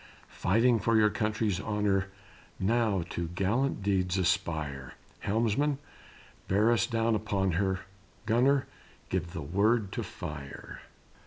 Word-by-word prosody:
Fighting 115 Hz, +5 st, +3 dB
for 115 Hz, +2 st, +2 dB
your 105 Hz, -1 st, +5 dB
country's 105 Hz, -3 st, 0 dB
honor, 105 Hz, -2 st, 0 dB, 0.5 s
Now 105 Hz, -2 st, +1 dB
to 85 Hz, -1 st, -2 dB
gallant 100 Hz, +8 st, 0 dB
deeds 95 Hz, -2 st, +1 dB
aspire; 80 Hz, -8 st, -1 dB, 0.2 s
Helmsman, 115 Hz, +7 st, +1 dB, 0.7 s
bear 105 Hz, +4 st, +3 dB
us 115 Hz, -5 st, +2 dB
down 115 Hz, -1 st, +1 dB
upon 100 Hz, -3 st, 0 dB
her, 95 Hz, +2 st, 0 dB, 0.4 s
Gunner, 130 Hz, +5 st, +3 dB, 0.4 s
give 85 Hz, 0 st, -2 dB
the 80 Hz, -4 st, -4 dB
word 100 Hz, +6 st, +1 dB
to -, -, -3 dB
fire!" 70 Hz, -2 st, -8 dB
100 Hz, 115 wpm, -30 LUFS, 95-115 Hz, 0.7 s, your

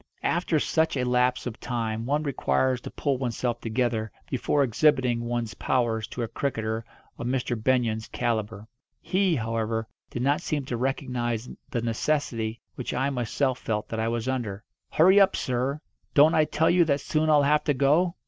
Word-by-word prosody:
After 170 Hz, -1 st, +1 dB
such 160 Hz, 0 st, +1 dB
a 125 Hz, -, 0 dB
lapse 125 Hz, 0 st, +2 dB
of 120 Hz, -3 st, -5 dB
time 115 Hz, -1 st, -3 dB
one 145 Hz, +2 st, +1 dB
requires 130 Hz, -2 st, +1 dB
to -, -, -7 dB
pull 140 Hz, -3 st, -1 dB
oneself 120 Hz, -1 st, -2 dB
together 115 Hz, -1 st, -1 dB, 0.2 s
before 140 Hz, +2 st, +1 dB
exhibiting 130 Hz, -1 st, +2 dB
one's 120 Hz, -1 st, -2 dB
powers 115 Hz, -3 st, 0 dB
to 125 Hz, -, -4 dB
a -, -, -2 dB
cricketer 110 Hz, -3 st, -2 dB, 0.4 s
of 120 Hz, -, -3 dB
Mr. 125 Hz, -1 st, -1 dB
Benyon's 115 Hz, -1 st, 0 dB
calibre. 110 Hz, -3 st, -2 dB, 0.3 s
He, 190 Hz, -2 st, +1 dB
however, 115 Hz, -2 st, -2 dB, 0.2 s
did 120 Hz, -, -3 dB
not 140 Hz, +4 st, +2 dB
seem 150 Hz, -5 st, -2 dB
to 125 Hz, -, -3 dB
recognise 125 Hz, -2 st, -2 dB, 0.2 s
the 120 Hz, -, -2 dB
necessity 115 Hz, -2 st, -1 dB
which 125 Hz, -, -4 dB
I 135 Hz, +3 st, +1 dB
myself 125 Hz, +1 st, -1 dB
felt 105 Hz, -1 st, -2 dB
that 110 Hz, -, -3 dB
I 110 Hz, -, 0 dB
was 115 Hz, +1 st, -2 dB
under. 115 Hz, -6 st, -3 dB, 0.3 s
"Hurry 185 Hz, +5 st, +6 dB
up, 195 Hz, -1 st, +5 dB
sir! 130 Hz, +3 st, -1 dB, 0.4 s
Don't 150 Hz, +2 st, +7 dB
I 155 Hz, -, +4 dB
tell 160 Hz, +2 st, +2 dB
you 175 Hz, 0 st, +5 dB
that 140 Hz, -3 st, +1 dB
soon 155 Hz, +2 st, 0 dB
I'll 150 Hz, -2 st, +5 dB
have 150 Hz, +1 st, +3 dB
to 145 Hz, -, +2 dB
go?" 155 Hz, +7 st, +3 dB
125 Hz, 175 wpm, -26 LUFS, 115-145 Hz, 0.4 s, Don't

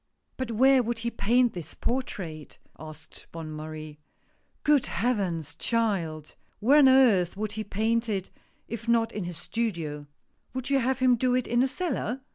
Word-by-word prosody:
" -, -, -47 dB
But 260 Hz, -2 st, -3 dB
where 265 Hz, +3 st, +5 dB
would 235 Hz, 0 st, -2 dB
he 235 Hz, +1 st, -3 dB
paint 240 Hz, +2 st, +2 dB
this 175 Hz, -3 st, -7 dB
portrait? 185 Hz, -, -4 dB
" -, -, -33 dB
asked 155 Hz, +1 st, -15 dB
Bonne 165 Hz, -2 st, -7 dB
Marie. 155 Hz, 0 st, -8 dB, 0.3 s
" -, -, -42 dB
Good 295 Hz, -3 st, +3 dB
Heavens, 175 Hz, -, -1 dB
child! 185 Hz, -10 st, -1 dB, 0.3 s
where 265 Hz, +8 st, +5 dB
on 270 Hz, -3 st, +7 dB
earth 220 Hz, -10 st, +4 dB
would 215 Hz, 0 st, -3 dB
he 215 Hz, +1 st, -4 dB
paint 225 Hz, +3 st, 0 dB
it, 195 Hz, -3 st, -3 dB, 0.4 s
if 230 Hz, +1 st, -6 dB
not 230 Hz, -1 st, +2 dB
in 205 Hz, -4 st, -4 dB
his 175 Hz, -2 st, -6 dB
studio! 170 Hz, -8 st, -3 dB, 0.5 s
Would 260 Hz, +1 st, -4 dB
you 275 Hz, -, +4 dB
have 260 Hz, 0 st, 0 dB
him 255 Hz, -2 st, +4 dB
do 250 Hz, +1 st, +2 dB
it 255 Hz, -, 0 dB
in 240 Hz, +1 st, +1 dB
a 265 Hz, -, +3 dB
cellar? 270 Hz, -, -3 dB
225 Hz, 180 wpm, -27 LUFS, 170-250 Hz, 0.5 s, on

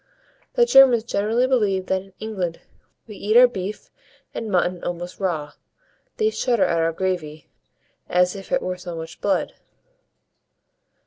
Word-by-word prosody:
The 485 Hz, -, +5 dB
Germans 270 Hz, -, +6 dB
generally 225 Hz, +2 st, 0 dB
believe 210 Hz, -8 st, +1 dB
that 190 Hz, 0 st, 0 dB
in 195 Hz, 0 st, -18 dB
England 190 Hz, -6 st, -4 dB, 0.5 s
we 210 Hz, -3 st, -11 dB
eat 215 Hz, +3 st, +2 dB
our 250 Hz, 0 st, +9 dB
beef 200 Hz, -2 st, -6 dB, 0.4 s
and 225 Hz, -, -5 dB
mutton 180 Hz, -2 st, 0 dB
almost 175 Hz, +1 st, -5 dB
raw; 160 Hz, -7 st, -2 dB, 0.7 s
they 435 Hz, -2 st, +2 dB
shudder 240 Hz, -, +1 dB
at 170 Hz, -1 st, +1 dB
our 165 Hz, 0 st, +1 dB
gravy, 165 Hz, -4 st, -4 dB, 0.6 s
as 180 Hz, +1 st, +2 dB
if 195 Hz, -1 st, -10 dB
it -, -, +1 dB
were 185 Hz, 0 st, -3 dB
so 180 Hz, -1 st, -7 dB
much 165 Hz, +1 st, -8 dB
blood. 200 Hz, -, 0 dB
190 Hz, 145 wpm, -22 LUFS, 175-220 Hz, 0.7 s, our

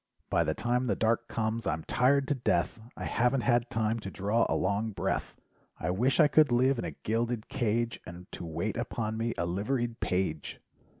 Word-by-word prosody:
By 85 Hz, -, +3 dB
the 80 Hz, -1 st, -1 dB
time 125 Hz, +1 st, 0 dB
the -, -, +1 dB
dark 115 Hz, +1 st, +1 dB
comes, 110 Hz, +1 st, -2 dB
I'm 80 Hz, 0 st, -1 dB
tired 135 Hz, +2 st, +2 dB
to -, -, +4 dB
death, 110 Hz, -, 0 dB, 0.2 s
I -, -, -4 dB
haven't 125 Hz, +2 st, +2 dB
had 120 Hz, -1 st, +2 dB
time 115 Hz, -2 st, 0 dB
to 100 Hz, -, -6 dB
draw 105 Hz, +5 st, +1 dB
a -, -, +1 dB
long 100 Hz, +4 st, 0 dB
breath— -, -, -2 dB, 0.4 s
I 80 Hz, -, -1 dB
wish 125 Hz, -, +1 dB
I 155 Hz, -, +8 dB
could 150 Hz, -2 st, +4 dB
live 130 Hz, +1 st, +3 dB
in -, -, -2 dB
a -, -, -2 dB
gilded 115 Hz, +1 st, -1 dB
cage, 120 Hz, -2 st, 0 dB
And 85 Hz, +1 st, -10 dB
to -, -, -7 dB
wait 85 Hz, +7 st, -3 dB
upon 115 Hz, -2 st, -2 dB
me 115 Hz, +1 st, -1 dB
a 85 Hz, -, 0 dB
liveried 115 Hz, +7 st, -1 dB
page. 90 Hz, -5 st, -2 dB
115 Hz, 195 wpm, -30 LUFS, 100-120 Hz, 0.4 s, I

